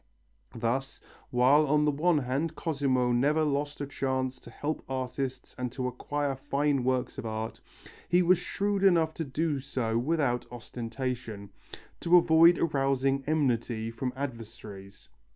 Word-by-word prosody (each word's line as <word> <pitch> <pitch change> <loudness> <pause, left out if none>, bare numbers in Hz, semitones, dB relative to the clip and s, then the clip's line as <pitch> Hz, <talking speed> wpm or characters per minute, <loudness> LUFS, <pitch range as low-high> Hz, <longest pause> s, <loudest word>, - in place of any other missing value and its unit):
Thus, 120 +4 -2 0.3
while 135 +5 +4
on 150 +1 +3
the 150 - +3
one 160 +3 +2
hand 145 +4 -1
Cosimo 135 -6 0
never 145 +6 +2
lost 145 0 -1
a - - -1
chance 130 -2 -2
to - - -13
help 145 +6 -4
artists 130 0 -4
and 125 -1 -2
to 130 -1 -2
acquire 140 +3 -2
fine 140 0 0
works 130 0 -1
of - - -6
art, 110 0 -4 0.5
he 180 +1 +4
was 180 0 +4
shrewd 200 +2 -1
enough 165 -4 +4
to 165 - -3
do 150 +1 -1
so 115 -4 -1
without 125 -4 0
ostentation, 115 -3 -5 0.5
to 175 +1 +5
avoid 170 0 +6
arousing 135 -3 +1
enmity 120 -7 0
from 125 +2 -3
adversaries. 115 -7 -8
135 Hz, 140 wpm, -29 LUFS, 125-150 Hz, 0.5 s, avoid